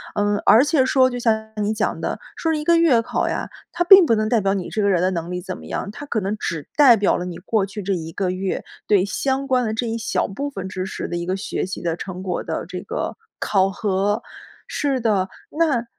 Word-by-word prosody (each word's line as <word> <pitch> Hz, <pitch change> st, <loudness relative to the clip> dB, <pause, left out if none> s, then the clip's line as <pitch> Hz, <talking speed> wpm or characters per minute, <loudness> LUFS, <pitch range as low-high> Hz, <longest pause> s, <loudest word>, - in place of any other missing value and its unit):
嗯， 205 Hz, 0 st, +1 dB
而 230 Hz, +4 st, +7 dB
且 290 Hz, -3 st, +3 dB
说 260 Hz, -1 st, +4 dB
就 245 Hz, -, -5 dB
像 220 Hz, -2 st, 0 dB
你 210 Hz, +1 st, 0 dB
讲 220 Hz, 0 st, -1 dB
的， -, -, -3 dB, 0.2 s
说 325 Hz, -, -1 dB
是 305 Hz, -, -1 dB
一 -, -, -4 dB
个 340 Hz, +2 st, +4 dB
月 295 Hz, -9 st, +4 dB
考 -, -, -1 dB
呀， -, -, -3 dB, 0.2 s
它 350 Hz, -, 0 dB
并 385 Hz, 0 st, +9 dB
不 235 Hz, -, +3 dB
能 215 Hz, 0 st, 0 dB
代 235 Hz, -, +3 dB
表 195 Hz, 0 st, +1 dB
你 190 Hz, -3 st, -3 dB
这 215 Hz, -, -1 dB
个 200 Hz, -, +2 dB
人 180 Hz, -3 st, +2 dB
的 185 Hz, -, +2 dB
能 170 Hz, -1 st, -4 dB
力 180 Hz, -, -3 dB
怎 185 Hz, 0 st, -6 dB
么 -, -, -12 dB
样， 200 Hz, -, -4 dB
它 290 Hz, +7 st, -9 dB
可 235 Hz, -6 st, -1 dB
能 200 Hz, +1 st, -2 dB
只 160 Hz, -7 st, -4 dB
代 270 Hz, -6 st, +7 dB
表 205 Hz, -, +2 dB
了 180 Hz, -, -4 dB
你 180 Hz, -2 st, -6 dB
过 205 Hz, +1 st, 0 dB
去 205 Hz, +1 st, -7 dB
这 195 Hz, +1 st, -1 dB
1 165 Hz, -2 st, -4 dB
个 185 Hz, +2 st, -1 dB
月， 185 Hz, +1 st, -2 dB, 0.2 s
对 200 Hz, -3 st, +4 dB
相 265 Hz, +7 st, -1 dB
关 255 Hz, -2 st, +2 dB
的 215 Hz, -, -1 dB
这 235 Hz, +1 st, -2 dB
一 225 Hz, -, -2 dB
小 225 Hz, -, -1 dB
部 280 Hz, +9 st, -4 dB
分 195 Hz, -9 st, -6 dB
知 185 Hz, 0 st, -4 dB
识 190 Hz, -, -5 dB
的 175 Hz, -, -4 dB
一 170 Hz, 0 st, -3 dB
个 185 Hz, +1 st, -1 dB
学 195 Hz, -, -3 dB
习 190 Hz, -, -6 dB
的 165 Hz, -2 st, -1 dB
成 185 Hz, 0 st, -7 dB
果 180 Hz, -2 st, -2 dB
的 -, -, -4 dB
这 -, -, -5 dB
个 -, -, -4 dB, 0.2 s
考 195 Hz, -1 st, +2 dB
核。 200 Hz, +1 st, 0 dB, 0.5 s
是 275 Hz, -3 st, -1 dB
的， 205 Hz, -5 st, +1 dB, 0.3 s
那 280 Hz, -8 st, +2 dB
210 Hz, 270 characters per minute, -22 LUFS, 190-250 Hz, 0.5 s, 并